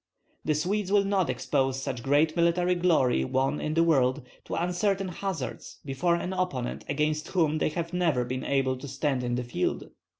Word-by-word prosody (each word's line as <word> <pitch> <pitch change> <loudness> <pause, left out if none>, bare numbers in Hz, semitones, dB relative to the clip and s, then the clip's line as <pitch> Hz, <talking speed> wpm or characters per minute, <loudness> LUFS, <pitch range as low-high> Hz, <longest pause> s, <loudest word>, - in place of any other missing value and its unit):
The 155 - +1
Swedes 190 +5 -1
will 205 -1 +5
not 195 -3 +1
expose 135 -2 0
such 135 -3 -4
great 145 +5 +2
military 175 +1 +2
glory 160 - +2
won 135 - 0
in 155 +1 -2
the 165 - +4
world 135 -4 +2 0.2
to - - -4
uncertain 185 +3 0
hazard 180 -5 -4 0.2
before 160 +6 +1
an 180 +2 -3
opponent 180 -10 -2
against 150 +2 0
whom 160 -4 +1
they - - +1
have 170 +2 -4
never 165 -9 +1
been 130 +1 -4
able 135 -2 +1
to 140 - -7
stand 135 -1 -1
in 120 0 -1
the 125 - -2
field. 120 -7 -2
155 Hz, 180 wpm, -28 LUFS, 135-180 Hz, 0.2 s, will